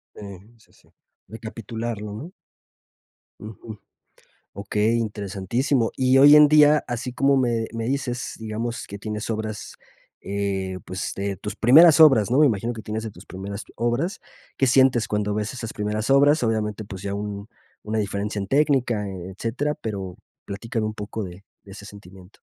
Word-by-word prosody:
Sí. - - -11 0.4
Sí, 110 - -26
sí. - - -26 0.4
Recapitularlo, 110 -1 -6
¿no? 145 - -8 1.1
Ujú. 110 0 -10 0.7
Okey, 105 +3 0
interesantísimo. 110 +4 -1
Y 130 0 +3
hoy 145 +2 +8
en 150 0 +8
día, 150 0 +5
así 120 +1 -4
como 135 +2 +3
me 120 -3 0
me 115 0 -3
dices, 125 -1 -3
digamos, 115 +2 -4
que 100 - -8
tienes 105 +1 -5
obras, 110 -1 -5 0.5
eh, 95 -2 -3
pues, 95 0 -4
de 100 0 -3
tus 105 +4 -6
primeras 150 +7 +7
obras, 135 -10 +6
¿no? 130 - +4
Me 155 - +7
imagino 115 0 -1
que 110 - -8
tienes 110 +1 -4
de 110 - -5
tus 95 +1 -15
primeras 100 +3 -7
obras, 120 - -1 0.4
¿qué 135 - +2
sientes 130 -2 +4
cuando 105 0 -1
ves 105 +2 -3
esas 120 -3 -6
primeras 105 +2 -3
obras? 140 +2 +4
Obviamente, 110 -2 -1
pues, 95 -2 -9
ya 100 0 -4
un 100 0 -5 0.3
una 110 +1 -3
diferencia 100 0 -3
en 100 - -4
técnica, 130 -6 +1
e 95 -2 -7
etcétera. 115 +9 -2
Pero 95 -5 -6 0.3
platícame 110 +2 -4
un 110 - -3
poco 105 +1 -5
de 90 +1 -10 0.2
de 100 - -14
ese 100 +1 -10
sentimiento. 95 -2 -14
110 Hz, 160 wpm, -23 LUFS, 100-125 Hz, 1.1 s, hoy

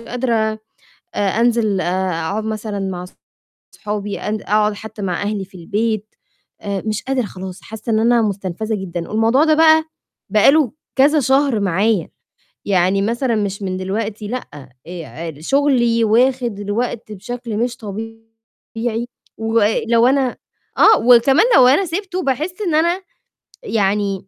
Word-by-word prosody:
قادرة 240 +1 -2 0.8
آآ - - -2 0.2
أنزل 225 -5 +2
آآ 185 +2 -1
أقعُد 165 +7 -2
مثلًا 215 -1 -4
مع 185 -2 -4 0.7
أصحابي، 210 -1 -4
أن 210 0 -3
أقعُد 210 0 +1
حتّى 215 0 -9
مع 185 -2 -2
أهلي 205 -1 -2
في 190 0 -15
البيت، 215 +4 -2 0.5
آآ 200 -2 -3
مش 215 0 -2
قادرة 265 -3 -1
خلاص، 185 -2 -8
حاسّة 220 +2 -6
إن 215 - +2
أنا 235 +1 +3
مُستنفَذة 205 +1 -2
جدًا. 180 -3 -5
الموضوع 225 +6 +3
ده 315 -1 +4
بقى، 315 0 +5 0.4
بقى 215 +5 +5
له 295 -6 +3 0.2
كذا 290 +3 +4
شهر 265 -3 +2
معايا، 195 0 +1 0.6
يعني 190 0 +2
مثلًا 235 +3 0
مش 200 -1 -2
من 185 -1 -2
دلوقتي، 205 +3 -4
لأ، 145 - -7 0.2
آآ 165 -2 -7
شُغلي 240 - +2
واخِد 240 0 +2
الوقت 215 +2 -3
بشكل 235 +2 -6
مش 240 +1 -1
طبيعي 225 +2 -7 0.3
و 225 +1 0
آآ 210 +1 +2
لو 235 0 +4
أنا 265 -2 +1 0.4
آه، 440 - +7
وكمان 250 - +5
لو 255 -1 +7
أنا 295 +9 +3
سِبته، 370 +2 -3
باحِس 305 +5 -1
إن 345 -6 -1
أنا 340 +4 +2 0.6
يعني 200 - -1
220 Hz, 145 wpm, -19 LUFS, 200-245 Hz, 0.8 s, آه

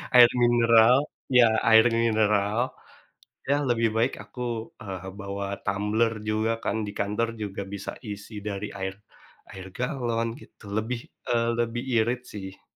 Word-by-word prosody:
Air 120 -1 +10
mineral, 120 0 +6 0.4
ya 125 -2 +7 0.2
air 110 0 +7
mineral. 110 0 +2 0.8
Ya 145 - +3
lebih 115 -1 +2
baik, 115 +3 +2
aku, 105 +4 -8 0.4
eee, 95 -2 -6
bawa 100 0 -4 0.2
tumbler 105 +3 +1 0.2
juga 110 +1 +1
kan, - - 0
di 100 - -5
kantor 105 +3 0
juga 100 -1 -4
bisa 100 - -5
isi 105 +1 -7
dari 100 +1 -4
air 95 0 -3 0.6
air 95 -1 -9
galon, 120 -3 -1
gitu. - - -18
Lebih, 115 +2 -2 0.3
eee, 115 -1 +2
lebih 120 0 -1
irit, 120 +3 +1
sih. 95 -2 -8
110 Hz, 135 wpm, -26 LUFS, 100-120 Hz, 0.8 s, Air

